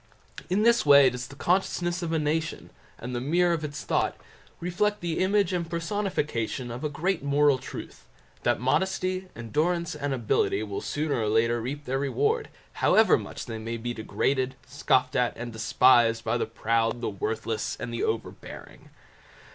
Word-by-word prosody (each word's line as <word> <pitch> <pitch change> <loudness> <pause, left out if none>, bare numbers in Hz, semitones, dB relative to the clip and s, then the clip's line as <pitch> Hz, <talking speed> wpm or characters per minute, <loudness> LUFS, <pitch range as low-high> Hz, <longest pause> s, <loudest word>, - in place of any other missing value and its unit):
In 195 +4 +2
this 235 +1 +4
way 140 -2 +7
does 125 0 -5
the 140 - -12
consciousness 175 +1 0
of 170 -2 -3
a 165 - +1
nation, 155 +1 -2 0.3
and 125 +2 -6
the 120 - -2
mirror 170 +6 +2
of 160 -2 -2
its 145 -1 -5
thought, - - 0 0.4
reflect 210 +4 0
the 170 -2 -2
image 190 0 +2
and 170 -2 -2
personification 165 - -2
of 120 +4 -6
a 150 - 0
great 175 +5 -1
moral 140 -1 +3
truth, - - -9 0.3
that - - +1
modesty, 185 +7 0
endurance, 160 +8 -1
and 145 -2 -3
ability 110 -4 +1
will 100 -2 -4
sooner 145 -4 -1
or 105 - 0
later 115 +2 +2
reap 145 +5 -5
their 135 +1 -1
reward, 430 - 0 0.2
however 220 0 +5
much - - -6
they 115 -2 -6
maybe 115 +2 -4
degraded, 130 +3 -1
scoffed 130 -1 +1
at, 125 -1 +1
and 120 -1 -6
despised 115 0 +4
by 110 +1 0
the 120 - -1
proud, 115 +1 0
the - - -1
worthless, 425 +2 -3
and - - -5
the - - -2
overbearing. 440 0 -5
145 Hz, 165 wpm, -27 LUFS, 120-175 Hz, 0.4 s, way